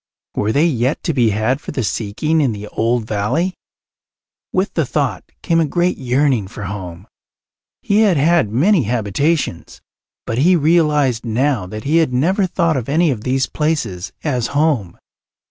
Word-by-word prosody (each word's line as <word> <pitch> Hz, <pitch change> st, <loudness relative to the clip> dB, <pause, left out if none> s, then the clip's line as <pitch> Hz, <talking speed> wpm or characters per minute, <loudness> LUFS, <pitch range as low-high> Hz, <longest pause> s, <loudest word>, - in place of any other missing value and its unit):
Were 105 Hz, -, 0 dB
they 145 Hz, +7 st, +3 dB
yet 130 Hz, -3 st, 0 dB
to 165 Hz, -, -1 dB
be 120 Hz, -5 st, +3 dB
had 110 Hz, +7 st, 0 dB
for -, -, -9 dB
the 130 Hz, -, -2 dB
seeking 115 Hz, -, -1 dB
in 130 Hz, -6 st, +1 dB
the 105 Hz, 0 st, -7 dB
old 115 Hz, 0 st, 0 dB
valley? 110 Hz, -, -1 dB, 1.0 s
With 185 Hz, +2 st, -1 dB
the 165 Hz, -, +1 dB
thought 140 Hz, 0 st, -2 dB, 0.2 s
came 165 Hz, -1 st, +2 dB
a 165 Hz, -, +3 dB
great 175 Hz, +4 st, 0 dB
yearning 130 Hz, -4 st, +1 dB
for 100 Hz, +1 st, -9 dB
home. 95 Hz, -2 st, -7 dB, 0.8 s
He 205 Hz, +1 st, +2 dB
had 205 Hz, -7 st, +4 dB
had 160 Hz, -4 st, +3 dB
many 170 Hz, -, +3 dB
habitations, 120 Hz, -, -1 dB, 0.5 s
but 115 Hz, -, -2 dB
he 180 Hz, +6 st, +5 dB
realized 150 Hz, -6 st, +2 dB
now 120 Hz, -3 st, 0 dB
that 110 Hz, +3 st, -7 dB
he 155 Hz, +4 st, +2 dB
had 160 Hz, -6 st, +2 dB
never 185 Hz, +10 st, +1 dB
thought 170 Hz, -4 st, 0 dB
of 125 Hz, 0 st, -4 dB
any 160 Hz, +2 st, +3 dB
of 115 Hz, -5 st, -4 dB
these 130 Hz, 0 st, +1 dB
places 125 Hz, -, -2 dB
as 125 Hz, -6 st, -1 dB
home. 140 Hz, -, 0 dB
135 Hz, 165 wpm, -18 LUFS, 110-160 Hz, 1.0 s, he